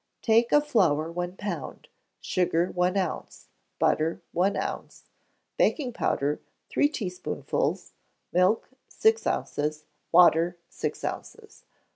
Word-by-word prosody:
Take 230 +1 +3
of 295 0 +4
flour 160 - +2
one 175 +2 -4
pound; 175 -9 -5 0.3
sugar, 175 -1 +1
one 180 +2 +1
ounce; 185 -4 -4 0.3
butter, 160 +2 +1
one 185 +4 +1
ounce; - - -5 0.5
baking 260 -6 +1
powder, 145 -6 0 0.3
three 290 - +3
teaspoonfuls; 185 -11 -3 0.4
milk, 185 +5 +3 0.2
six 445 +1 +2
ounces; 150 +1 -2 0.3
water, 170 0 +5
six - - -4
ounces. 445 -1 -7
180 Hz, 105 wpm, -27 LUFS, 165-230 Hz, 0.5 s, water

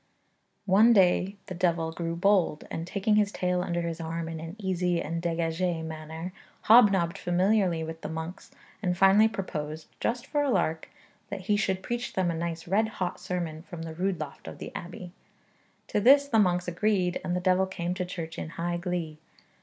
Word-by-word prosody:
One 210 +5 +6
day 190 0 +3
the - - -6
devil 170 -2 0
grew 165 0 -3
bold, 185 -3 +2
and 165 +1 -4
taking 205 +3 +1
his 205 -1 +3
tail 180 -2 0
under 175 -1 -1
his 165 0 -4
arm 165 0 -3
in 165 -1 -5
an 165 +3 -7
easy 180 -4 0
and 165 +1 -3
dégagée 165 0 -1
manner, 160 +2 -6 0.3
hobnobbed 200 -7 +5
familiarly 180 -1 +2
with 160 0 -7
the - - -5
monks, 160 +2 -6 0.3
and 180 -3 0
finally 195 +3 +6
proposed, 155 -7 -5
just 240 +1 -1
for 295 -1 0
a 290 - +1
lark, 165 -7 0 0.4
that - - -5
he 205 +3 +1
should 190 -2 0
preach 240 0 -3
them 185 -2 +1
a - - -3
nice 165 0 -4
red 210 +5 +2
hot 180 -2 -2
sermon 170 -3 -4
from 170 -2 -8
the 165 -1 -6
rood 185 +2 -1
loft 150 -3 -7
of - - -7
the - - -7
abbey. 175 0 -7 0.8
To - - +1
this 280 +6 +6
the 225 -5 +3
monks 180 -3 +2
agreed, 180 0 0
and 175 - -1
the - - +1
devil 185 +1 +2
came 175 -2 -3
to 180 0 -2
church 170 -2 -6
in - - -5
high 175 +1 -1
glee. 170 -3 -3
180 Hz, 190 wpm, -28 LUFS, 165-195 Hz, 0.8 s, One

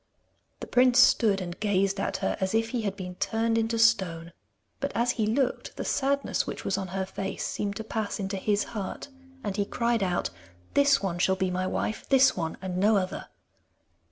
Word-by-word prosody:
The - - -4
prince 250 0 +4
stood 220 -5 +5
and 175 -1 -6
gazed 195 -1 +1
at 195 - -1
her, - - +1
as 190 +3 0
if 225 0 +1
he 245 -2 -2
had 200 -2 -2
been 180 -2 -6
turned 225 0 0
into 225 0 0
stone, 180 -8 +2 0.5
but 280 +1 -2
as 240 +1 +2
he 220 -3 -1
looked 250 +4 -1
the - - -4
sadness 280 +1 0
which, - - -6
was 195 - +1
on 190 -1 -3
her 190 +1 -3
face 195 +1 -4
seemed 200 -1 -3
to 220 - -5
pass 220 -1 -3
into 195 0 -3
his 205 +1 +1
heart, 205 +5 -5 0.3
and 205 -2 -3
he 205 - +1
cried 235 +2 0
out: 180 - 0 0.4
'This 280 -5 +4
one 175 -3 -2
shall 190 +1 +3
be 190 -1 -1
my 185 +1 -1
wife. 215 - -3
This 270 -1 +5
one 165 -3 -3
and 180 -1 -3
no 205 +3 +4
other. 185 -1 -3
205 Hz, 200 wpm, -27 LUFS, 190-230 Hz, 0.5 s, stood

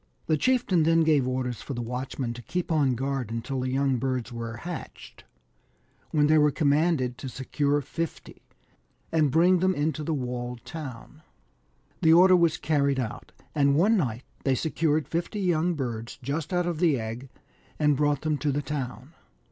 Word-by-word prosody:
The 155 - +2
chieftain 230 - +2
then 165 +1 +4
gave 150 -5 +3
orders 125 -2 -2
for 140 - -6
the 120 - -3
watchmen 125 0 -4
to 120 - -9
keep 175 +7 -3
on 140 -5 +2
guard 135 -2 -2
until 115 +4 -3
the 130 0 -1
young 135 0 +1
birds 125 -2 -2
were 115 -1 -5
hatched, 175 +5 -8 0.8
when 150 -2 +3
they 155 +1 +5
were 150 0 +5
commanded 145 -3 +1
to 135 - -5
secure 145 +3 0
fifty, 165 +4 -6 0.7
and 155 -3 +3
bring 175 +5 +4
them 185 +1 +2
into 155 +1 -1
the 160 - -2
walled 125 -2 -4
town. 145 +1 -8 0.8
The 160 0 +6
order 185 +2 +7
was 170 -3 +3
carried 140 -3 +1
out, 115 -4 -5 0.2
and 140 -1 +3
one 200 +9 +4
night 125 - -1 0.2
they 135 -1 +2
secured 155 +1 0
fifty 175 +5 -3
young 175 -2 +1
birds 120 -5 -4
just 145 +5 -3
out 180 -1 +1
of 170 -3 -2
the 160 -7 +3
egg, 115 +4 -6 0.5
and 150 -1 +3
brought 145 0 +1
them 155 -2 -1
to 150 - 0
the 145 +2 -1
town. 135 0 -5
145 Hz, 170 wpm, -27 LUFS, 130-160 Hz, 0.8 s, order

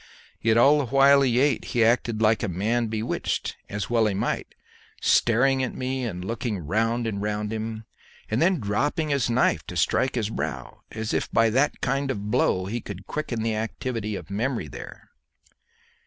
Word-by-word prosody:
Yet 115 0 +3
all 140 +5 +6
the 140 - -1
while 140 +2 +5
he 125 -3 +2
ate 140 -2 +2
he 115 -2 +1
acted 115 -1 +1
like 110 0 +3
a 115 - -1
man 110 +6 0
bewitched, 110 +1 -2
as 100 0 -3
well 115 -2 +2
he 100 - -1
might, 95 - -2 0.4
staring 130 +3 +3
at 130 - -2
me 130 0 -2
and 90 -5 -5
looking 115 0 -2
round 115 +8 0
and 100 -3 -3
round 105 +1 -2
him, 110 0 -5 0.4
and 110 - -1
then 175 0 +3
dropping 140 +9 -1
his 140 -4 +1
knife 120 +2 +2
to - - -5
strike 130 - +1
his 110 -3 -1
brow, 70 - -5
as 110 0 -4
if - - -1
by 115 0 +3
that 135 +6 +1
kind 135 +1 0
of 105 -5 -3
blow 95 -2 +2
he 115 +5 -3
would 100 -2 -7
quicken 120 -3 -3
the 115 -1 0
activity 110 -1 -3
of 90 0 -8
memory 115 - -1
there. 65 - -10
115 Hz, 185 wpm, -25 LUFS, 105-130 Hz, 0.4 s, all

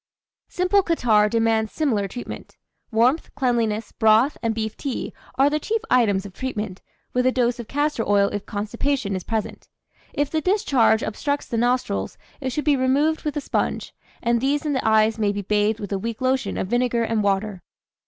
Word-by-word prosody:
"Simple 365 +3 +2
Catarrh 230 - +3
demands 225 -1 +1
similar 230 -11 0
treatment. 240 +6 -8 0.3
Warmth, 245 +8 +2
cleanliness, 230 -5 0
broth, 220 +5 +4
and 225 -2 -1
beef 220 -1 -3
tea, 275 -4 -4 0.2
are 275 - +5
the 300 +1 +1
chief 445 +8 -1
items 205 -6 +3
of 195 - -9
treatment, 215 -6 -4 0.3
with 250 0 +2
a - - +4
dose 245 -1 0
of 235 - -6
castor 290 -4 0
oil 200 -1 +4
if 205 - -5
constipation 215 +1 -2
is 185 - -4
present. 220 -1 -4 0.4
If 290 0 -1
the 315 - 0
discharge 275 - +3
obstructs 285 +6 -2
the 230 - -3
nostrils 245 +2 0 0.2
it 265 -3 -2
should 295 +4 -3
be 295 -2 +4
removed 280 +5 +2
with 300 0 -3
a - - -1
sponge, - - -2 0.3
and 235 -1 +2
these 285 +3 0
and 295 -2 0
the 260 - -1
eyes 220 0 +3
may 205 -2 +2
be 205 0 -4
bathed 210 +2 +1
with 205 -2 -5
a 195 - -1
weak 230 +2 -4
lotion 255 -5 0
of - - -1
vinegar 240 0 +1
and 225 -1 0
water." 200 -1 -1
235 Hz, 185 wpm, -23 LUFS, 215-275 Hz, 0.4 s, are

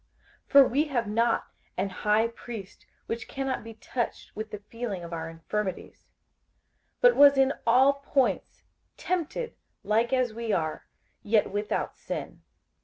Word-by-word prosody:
58:004:015 - - -39
For 275 -2 +9
we 285 +5 +2
have 250 -7 -1
not 230 +3 +1 0.3
an 195 +2 0
high 210 +4 +2
priest 225 -4 -9 0.2
which 230 0 -4
cannot 270 -3 -3
be 225 0 -10
touched 240 +1 -4
with 215 +1 -5
the 210 - -6
feeling 205 -2 -6
of 170 0 -7
our 165 0 -4
infirmities; 185 +4 -5 0.9
but - - +6
was 285 -1 +7
in 270 0 +4
all 260 +4 +6
points 275 -2 0 0.3
tempted 365 +7 -2 0.3
like 225 +3 +1
as 255 -3 +1
we 230 0 -3
are, 160 -5 -2 0.3
yet 210 -1 +2
without 205 +1 -2
sin. - - -6
230 Hz, 145 wpm, -28 LUFS, 205-265 Hz, 0.9 s, For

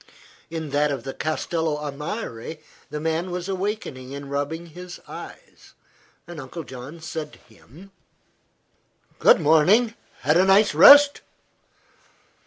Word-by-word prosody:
In 160 -3 -5
that 145 +1 +2
of 135 -5 -4
the 135 - -6
Castello 155 0 -2
a 150 -1 -5
Mare 150 - -6 0.3
the 150 - -5
man 160 +3 -2
was 180 0 -5
awakening 185 -10 -4
and 140 0 -9
rubbing 145 +4 -3
his 175 +2 -10
eyes. - - -12 0.5
Uncle 165 -1 -8
John 130 +4 -10
said 160 -2 -6
to - - -15 0.2
him: 165 - -17 1.3
"Good - - +6
morning. 190 +10 +4 0.3
Had 150 +5 +2
a 180 - +5
nice 195 0 +4
rest?" 285 - +8
160 Hz, 125 wpm, -23 LUFS, 145-180 Hz, 1.3 s, rest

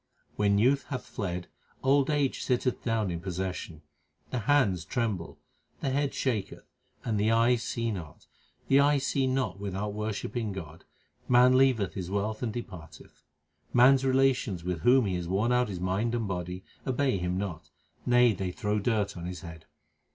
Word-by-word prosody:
When 100 -1 +2
youth 130 +4 +3
hath 130 - -5
fled, 90 -3 -4 0.4
old 135 +1 +3
age 145 -3 0
sitteth 125 0 0
down 110 -5 0
in 85 - -3
possession. 90 -3 -5 0.5
The 125 - -1
hands 115 - +2
tremble, 105 -4 -3 0.4
the 135 - -1
head 140 +1 0
shaketh, 110 -7 -2 0.4
and 110 -3 0
the 105 +2 +2
eyes 115 +1 +3
see 115 -1 -2
not: 85 -7 -8 0.4
The 135 - +5
eyes 140 -1 +3
see 135 -1 +1
not 130 -5 -1
without 100 +1 -3
worshipping 105 +1 -3
God; 85 -4 -9 0.4
man 125 +1 +6
leaveth 130 -8 +3
his 90 -2 -5
wealth 105 +2 -2
and 120 -3 -1
depart 90 -9 -8
eth. - - -19 0.5
Man 125 +3 +8
s 135 -1 +1
relations 130 -8 +2
with 90 -1 -2
whom 125 +3 +4
he 95 - -1
hath 90 -1 -3
worn 100 +7 +1
out 125 -2 +2
his 95 -3 -5
mind 95 +6 0
and 115 -3 -1
body, 90 0 -4 0.2
obey 130 -5 +1
him 90 +1 -1
not; 85 -6 -5 0.3
nay, 125 -2 +4
they 95 -1 -3
throw 105 +2 -1
dirt 105 -2 0
on 85 -1 -6
his 90 -3 -6
head. 80 -1 -10
105 Hz, 175 wpm, -29 LUFS, 95-125 Hz, 0.5 s, Man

